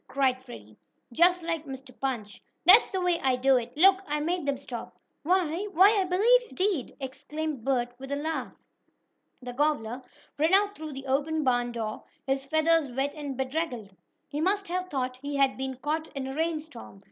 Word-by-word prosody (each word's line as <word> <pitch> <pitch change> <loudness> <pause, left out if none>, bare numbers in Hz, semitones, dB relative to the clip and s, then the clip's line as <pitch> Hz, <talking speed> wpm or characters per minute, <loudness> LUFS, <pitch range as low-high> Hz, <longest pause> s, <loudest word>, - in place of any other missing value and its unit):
cried 260 -2 0
Freddie, 110 - -12 0.4
just 350 +5 +4
like 330 -2 -2
Mr. 265 -1 -8
Punch. 230 -7 -4 0.2
"That's 385 +7 +8
the 380 - -2
way 355 -2 +2
I 260 -1 +2
do 260 +1 +4
it! 240 0 -4
Look, 380 +3 +6
I 300 0 -1
made 335 0 -2
them 280 -1 0
stop!" 255 -3 -8 0.2
"Why 355 +3 0
why, 390 +5 +6
I - - 0
believe 430 +8 +4
you - - -14
did!" 370 -8 -1
exclaimed 285 +1 -5
Bert, 245 -2 0
with 270 +1 -8
a - - +1
laugh. 315 +3 -3 0.9
The 245 0 -6
gobbler 260 -4 0 0.4
ran 320 +5 +4
out 405 +1 +3
through 310 -1 -7
the 270 0 -8
open 295 +4 0
barn 245 -2 +1
door, 220 -2 -4 0.2
his 270 0 0
feathers 315 -1 +2
wet 270 +3 -1
and 285 -4 -6
bedraggled. 260 -7 -3 0.3
He 295 +1 -4
must 395 +3 +1
have 365 +1 -2
thought 255 -2 -2
he 285 +2 -5
had 275 -1 +3
been 265 0 -4
caught 310 +4 -2
in 270 -1 -3
a 265 - -5
rainstorm. 305 - -4
285 Hz, 185 wpm, -28 LUFS, 260-330 Hz, 0.9 s, That's